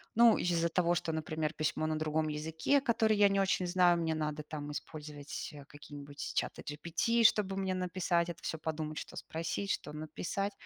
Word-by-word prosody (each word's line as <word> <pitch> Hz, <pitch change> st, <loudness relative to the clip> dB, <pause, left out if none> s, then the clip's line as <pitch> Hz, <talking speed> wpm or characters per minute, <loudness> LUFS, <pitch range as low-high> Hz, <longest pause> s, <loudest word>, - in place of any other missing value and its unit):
ну, 235 Hz, -1 st, +7 dB
из-за 170 Hz, -1 st, +1 dB
того, 175 Hz, 0 st, +2 dB
что, 175 Hz, -1 st, -1 dB
например, 155 Hz, 0 st, -2 dB
письмо 155 Hz, +1 st, -1 dB
на 155 Hz, 0 st, 0 dB
другом 155 Hz, 0 st, 0 dB
языке, 160 Hz, -, +1 dB
который 220 Hz, -4 st, +3 dB
я 205 Hz, 0 st, +6 dB
не 195 Hz, 0 st, +2 dB
очень 190 Hz, -1 st, +2 dB
знаю, 175 Hz, -1 st, +4 dB
мне 165 Hz, -1 st, 0 dB
надо 150 Hz, -1 st, -2 dB
там 150 Hz, -1 st, -6 dB
использовать, 150 Hz, -1 st, -6 dB
э, 145 Hz, -, -10 dB
какие-нибудь 145 Hz, 0 st, -8 dB
чаты -, -, -2 dB
GPT, 170 Hz, +10 st, 0 dB
чтобы 200 Hz, -3 st, +4 dB
мне 190 Hz, -1 st, 0 dB
написать 180 Hz, -1 st, 0 dB
это 170 Hz, -2 st, -7 dB
всё, 160 Hz, -, -2 dB
подумать, 155 Hz, 0 st, -4 dB
что -, -, -6 dB
спросить, 165 Hz, +5 st, -3 dB
что -, -, -3 dB
написать. 165 Hz, +6 st, -3 dB
160 Hz, 180 wpm, -33 LUFS, 155-185 Hz, -, ну